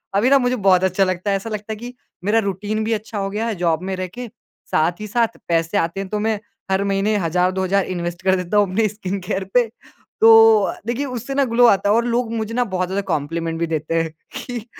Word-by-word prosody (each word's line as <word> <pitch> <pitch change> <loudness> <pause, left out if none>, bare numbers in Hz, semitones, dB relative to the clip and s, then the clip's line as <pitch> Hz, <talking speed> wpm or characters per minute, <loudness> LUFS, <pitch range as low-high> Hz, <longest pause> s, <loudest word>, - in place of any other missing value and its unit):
अभी 215 +6 +3
ना 275 - +6
मुझे 250 0 +1
बहुत 185 -1 +5
अच्छा 190 +1 +2
लगता 185 +1 -1
है। - - +2
ऐसा 210 +4 -7
लगता 215 0 -5
है - - -5
कि 240 +3 -8 0.3
मेरा 210 +4 +3
रूटीन 205 +3 -3
भी 225 +1 0
अच्छा 215 0 -5
हो 195 -1 -2
गया 215 +3 -2
है 225 - -2
जॉब 165 -2 +1
में 190 - -1
रह 185 - -2
के 245 +7 -8 0.4
साथ 165 +3 +1
ही 215 - -5
साथ 230 +1 0
पैसे 165 +3 +1
आते 170 0 -1
हैं। 195 -1 -5
तो 210 - -2
मैं 215 0 0 0.3
हर 190 +1 +2
महीने 200 +2 +1
हज़ार, 180 0 +1
दो 190 0 -2
हज़ार 195 +1 +1
इन्वेस्ट 175 0 -4
कर 190 0 +3
देता 180 +2 -1
हूँ 205 -2 +3
अपने 215 +3 +2
स्किन 200 -1 -4
केयर 195 -2 -1
पे। 245 -1 +4 0.6
तो 225 -2 +7
देखिए 245 +4 -1
उससे 250 0 -5
ना 280 - +3
ग्लो 245 0 +4
आता 200 -2 +3
है। 210 - +4
और 235 +1 +2
लोग 240 -1 0
मुझे 220 0 -3
ना 245 +1 +2
बहुत 185 0 0
ज़्यादा 195 +2 -1
कॉम्प्लीमेंट 165 +2 -3
भी 170 - 0
देते 160 +2 0
हैं 165 -1 -4 0.4
कि 240 -3 -5
200 Hz, 245 wpm, -20 LUFS, 185-225 Hz, 0.6 s, तो